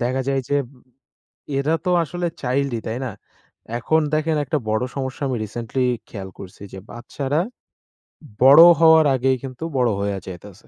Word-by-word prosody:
দেখা 130 +2 0
যায় 135 -1 +1
যে 145 - +1 1.0
এরা 145 +4 +1
তো 180 - 0
আসলে 175 +4 -4 0.2
চাইল্ডই 130 -1 -1
তাই 115 +3 -3
না? - - -3 0.7
এখন 155 +6 +1
দেখেন 155 +1 0
একটা 145 +2 -1
বড় 110 +3 0
সমস্যা 130 0 -5
আমি 130 - -1
রিসেন্টলি 120 +4 -3 0.2
খেয়াল 95 -3 -7
করসি 95 +1 -11
যে, 95 - -8
বাচ্চারা 135 +5 -3 1.0
বড় 140 +4 +9 0.2
হওয়ার 160 -1 +6
আগেই 130 +1 +1
কিন্তু 130 +3 -7
বড় 125 -2 +2
হয়ে 100 -1 -2
যাইতেসে। 95 +2 -11
130 Hz, 150 wpm, -21 LUFS, 115-145 Hz, 1.0 s, বড়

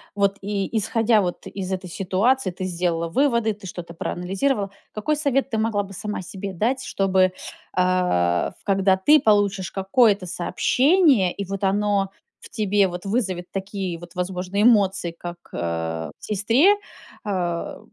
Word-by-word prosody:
вот 200 -1 +1
и 200 +1 -3
исходя 225 +1 +2
вот 180 -2 -4
из 190 -1 -5
этой 185 0 -3
ситуации? 195 +7 +1
Ты 180 +1 -6
сделала 170 -2 -1
выводы, 235 - +2
ты 205 -1 -11
что-то 175 -2 -8
проанализировала? 195 +6 -1 0.2
Какой 295 +9 -1
совет 275 -2 0
ты 220 - 0
могла 220 -2 0
бы 195 0 -11
сама 210 0 -5
себе 195 +2 -6
дать, 235 +9 0
чтобы, 190 -1 +2 0.4
а, 180 - +1
в - - -29
когда 195 -1 +3
ты 295 +11 +5
получишь 205 -6 +2
какое-то 200 0 +2
сообщение, 250 - +3
и 200 - -5
вот 195 +1 -5
оно 200 0 +1 0.3
в - - -13
тебе 205 -2 +2
вот 180 +1 -7
вызовет 190 -5 -2
такие 195 -3 -4
вот, 175 0 -13
возможно, 180 +2 -3
эмоции, 200 -6 +3
как, 175 0 -7 0.2
э, 80 -1 -3
в - - -10
сестре, 230 - +4
э, - - -1 0.5
в 175 -4 -2
195 Hz, 155 wpm, -23 LUFS, 180-215 Hz, 0.5 s, ты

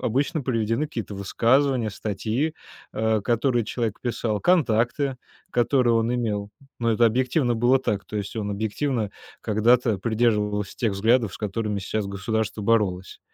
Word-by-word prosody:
обычно 140 +6 0
приведены 115 +3 0
какие-то 110 - -6
высказывания, 120 +4 +2
статьи, 110 +10 -2 0.4
э, 110 0 +1
которые 120 +1 +1
человек 115 -1 -3
писал, 115 -3 -2
контакты, 135 -4 +2 0.3
которые 120 0 +2
он 115 +1 +1
имел. 105 -4 -2 0.3
Но 115 0 +2
это 115 +1 +4
объективно 125 +2 +1
было 120 +3 +3
так. 105 -6 -2
То 105 - -6
есть 100 +1 -4
он 105 -2 -3
объективно 110 +2 -1 0.3
когда-то 115 0 +2
придерживался 105 -2 0
тех 110 -4 0
взглядов, 110 +1 +2
с - - -9
которыми 105 0 -2
щас 100 +2 -2
государство 105 +1 -2
боролось. 100 -4 0
115 Hz, 140 wpm, -24 LUFS, 105-125 Hz, 0.4 s, это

